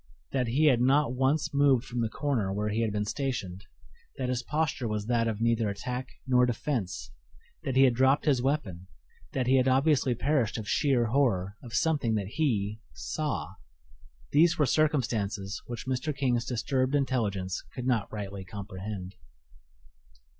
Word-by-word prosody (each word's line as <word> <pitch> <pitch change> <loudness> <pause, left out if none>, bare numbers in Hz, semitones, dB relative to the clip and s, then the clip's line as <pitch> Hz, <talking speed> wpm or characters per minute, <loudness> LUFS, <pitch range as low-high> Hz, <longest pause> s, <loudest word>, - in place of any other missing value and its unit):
That 130 -3 0
he 135 +7 +2
had 130 -5 +5
not 135 +1 +3
once 140 +4 +1
moved 140 -3 +4
from 120 -2 -3
the 115 - 0
corner 120 -8 -1
where 105 +2 -1
he 110 +2 0
had 110 -2 0
been 105 0 -1
stationed; 105 -7 -3 0.5
that 130 -2 -2
his 125 -1 0
posture 150 -2 -1
was 105 -1 -2
that 115 0 +1
of 110 -2 -2
neither 115 -2 +2
attack 125 +5 -4 0.2
nor 125 -1 +4
defense; 105 - -3 0.5
that 130 - -3
he 135 - +6
had 130 -2 +5
dropped 130 +3 +3
his 135 -5 +3
weapon; 115 - -2 0.5
that 130 - 0
he 130 +2 +4
had 130 0 +3
obviously 135 -1 +3
perished 125 -3 +1
of 110 -2 -6
sheer 130 -4 +2
horror 105 -8 +1
of 120 -3 -7
something 145 -9 +1
that 100 -3 -2
he 105 -7 0 0.2
saw - - -3 0.8
these 165 +4 +4
were 150 - +3
circumstances 115 -9 0
which 120 -2 -6
Mr. 130 +3 -2
King's 125 -3 +1
disturbed 130 +3 0
intelligence 105 -10 -1
could 125 - -6
not 120 -6 0
rightly 100 -2 -5
comprehend. 95 0 -7
125 Hz, 160 wpm, -29 LUFS, 105-135 Hz, 0.8 s, he